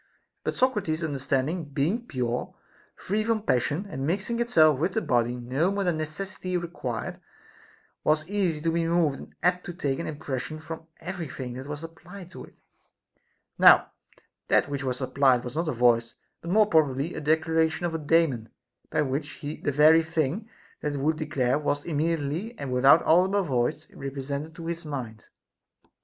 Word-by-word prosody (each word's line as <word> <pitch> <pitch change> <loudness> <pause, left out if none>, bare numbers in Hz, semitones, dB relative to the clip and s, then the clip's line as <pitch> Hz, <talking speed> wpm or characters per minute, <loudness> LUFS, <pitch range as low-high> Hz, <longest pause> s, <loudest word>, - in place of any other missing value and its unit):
But - - -2
Socrates's 205 -11 +1
understanding 140 +3 -1
being 155 - -1
pure, 125 -3 -2 0.4
free 210 +3 -1
from 220 -1 0
passion, 145 - 0
and 135 -9 -5
mixing 200 +7 -1
itself 155 - +4
with 175 +5 0
the 220 - +1
body 120 -1 +1
no 130 +8 0
more 200 0 -1
than 175 -4 0
necessity 180 +3 -4
required, 165 -9 -4 0.8
was 155 0 +2
easy 185 -6 0
to 165 +1 +1
be 165 0 0
moved 165 -4 +2
and - - -12
apt 180 +1 +2
to 175 - -5
take 140 -6 -1
an 170 - -3
impression 145 0 -4
from 160 +1 -8
every 180 -3 -5
thing 125 -2 -6
that 130 +2 -7
was 150 +1 -6
applied 175 +3 -11
to - - -9
it; - - -22 1.0
now - - +7 0.6
that - - +3
which 140 -1 -3
was 130 0 -2
applied 130 -1 +3
was 125 +2 -7
not 165 0 0
a - - +1
voice, 120 -2 +2 0.3
but 170 - -7
more 215 +4 +5
probably 155 -4 +2
a - - -5
declaration 160 +2 +1
of 170 - -2
a 160 - -2
Daemon, 145 -7 +2 0.4
by - - +1
which 145 +2 -3
the 145 0 -3
very 155 +3 +6
thing 165 - -2 0.3
that 150 - -2
it 140 - -3
would 155 +3 +1
declare 140 -4 0
was 145 -1 -1
immediately 165 +6 -2
and 135 -2 -4
without 135 +5 +6
audible 190 +4 +4
voice 145 +1 -1
represented 140 +3 -5
to 165 - -8
his 170 +1 -4
mind. 125 -8 -6
155 Hz, 170 wpm, -27 LUFS, 135-170 Hz, 1.0 s, now